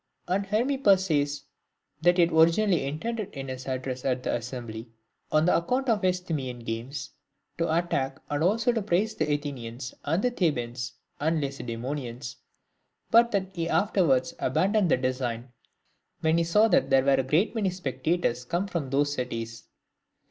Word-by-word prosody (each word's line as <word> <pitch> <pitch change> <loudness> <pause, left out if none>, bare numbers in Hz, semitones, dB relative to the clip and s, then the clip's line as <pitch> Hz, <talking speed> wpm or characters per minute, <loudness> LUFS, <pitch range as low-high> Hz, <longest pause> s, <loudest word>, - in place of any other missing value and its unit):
And 195 +2 0
Hermippus 215 -3 +3
says, 145 -4 0 0.6
that 175 +2 +4
he - - +6
had 170 0 +3
origi 160 +1 +5
nally 195 -9 +2
intended 205 +9 -4
in 135 -1 -5
his 130 0 -6
address 130 -1 -3
at 130 -1 0
the - - -1
assembly, 120 -1 -5 0.4
on 155 +2 +3
account 250 +10 +1
of 215 -3 +2
the 185 - +2
Isthmian 155 -9 -2
games, 115 +5 -5 0.5
to 165 -1 +1
attack 145 -5 0
and 145 +1 -1
also 225 +6 +3
to 230 -2 -1
praise 205 +2 +1
the 155 -7 -1
Athenians, 130 -4 -4
and 165 +7 0
Thebans, 125 - -1 0.3
and 160 +2 +1
Lacedaemonians; 125 -2 -5 0.7
but 235 +1 +6
that 190 -2 -2
he 165 -1 -2
afterwards 175 -12 +2
abandoned 190 +8 +2
the - - +4
design, 130 -1 -2 0.7
when 160 +1 +3
he 170 - +1
saw 210 +7 +4
that 170 -9 +3
there 135 -1 +5
were 140 - +5
a 135 0 +3
great 155 - +2
many 215 -5 +1
spectators 145 -5 -1
come 175 +9 -1
from 170 -8 -3
those 145 +2 +1
cities. 115 -3 -4
150 Hz, 160 wpm, -27 LUFS, 130-185 Hz, 0.7 s, he